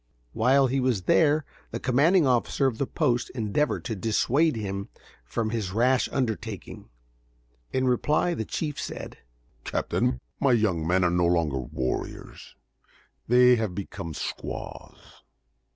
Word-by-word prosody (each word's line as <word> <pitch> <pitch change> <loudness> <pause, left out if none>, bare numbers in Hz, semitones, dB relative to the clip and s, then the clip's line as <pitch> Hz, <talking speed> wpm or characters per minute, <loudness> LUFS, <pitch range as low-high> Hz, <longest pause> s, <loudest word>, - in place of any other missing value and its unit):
While 135 +4 +4
he 135 +1 0
was 125 -7 0
there 150 - +3 0.2
the - - -5
commanding 150 +7 +3
officer 130 +2 +1
of 125 -4 0
the 140 - 0
post 125 -6 0
endeavored 115 +6 -1
to 110 - -2
dissuade 120 - +1
him 100 -2 -4 0.3
from 110 - -2
his 105 -5 -3
rash 125 +4 +2
undertaking. 110 - -4 0.8
In 130 0 0
reply 150 +7 +2
the 130 - -2
chief 150 +6 -4
said: - - -7 0.4
"Captain, 65 - -1 0.2
my 135 -3 +3
young 95 -9 +1
men 90 +1 +3
are 90 - +3
no 90 0 +2
longer 80 -6 +1
warriors. 65 0 -5 0.7
They 125 +1 +6
have 110 -5 -2
become 85 -5 -6
squaws. - - -7
115 Hz, 135 wpm, -26 LUFS, 100-135 Hz, 0.8 s, They